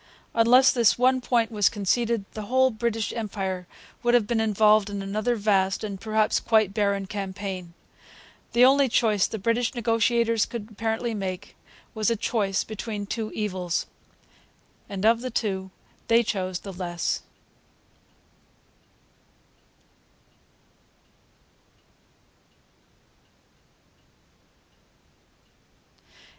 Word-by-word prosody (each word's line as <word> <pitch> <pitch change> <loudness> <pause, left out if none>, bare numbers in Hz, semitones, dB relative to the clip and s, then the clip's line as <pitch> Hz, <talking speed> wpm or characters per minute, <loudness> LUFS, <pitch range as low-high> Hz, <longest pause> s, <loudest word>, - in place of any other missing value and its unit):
Unless 245 +3 +6
this 235 -4 +3
one 255 +1 +3
point 235 -2 +1
was 210 -3 +3
conceded 225 +1 0
the 215 -2 -7
whole 260 +2 +3
British 225 -1 -2
Empire 190 -5 -4 0.3
would 240 0 +3
have 235 -3 +3
been 235 +1 0
involved 215 -1 +3
in 200 -1 -4
another 215 +5 -1
vast, 195 -3 +1
and 200 -2 -5
perhaps 215 -1 +1
quite 215 -4 +2
barren, 200 -2 0
campaign. 190 -3 -6 0.8
The 240 +2 +6
only 275 0 +4
choice 215 -4 +2
the 220 - -5
British 230 +4 0
negotiators 230 0 +1
could 230 -3 -7
apparently 225 +2 -2
make 195 -2 -5 0.4
was 220 +1 0
a 230 - +1
choice 205 -3 -1
between 215 -1 -5
two 215 +1 -4
evils. 185 -5 -2 1.0
And 200 0 -3
of 230 +1 +4
the 255 - -4
two 195 -5 -2 0.4
they 230 +1 +4
chose 185 -4 -3
the 195 - -8
less. 175 -2 -3
215 Hz, 100 wpm, -25 LUFS, 195-230 Hz, 1.0 s, Unless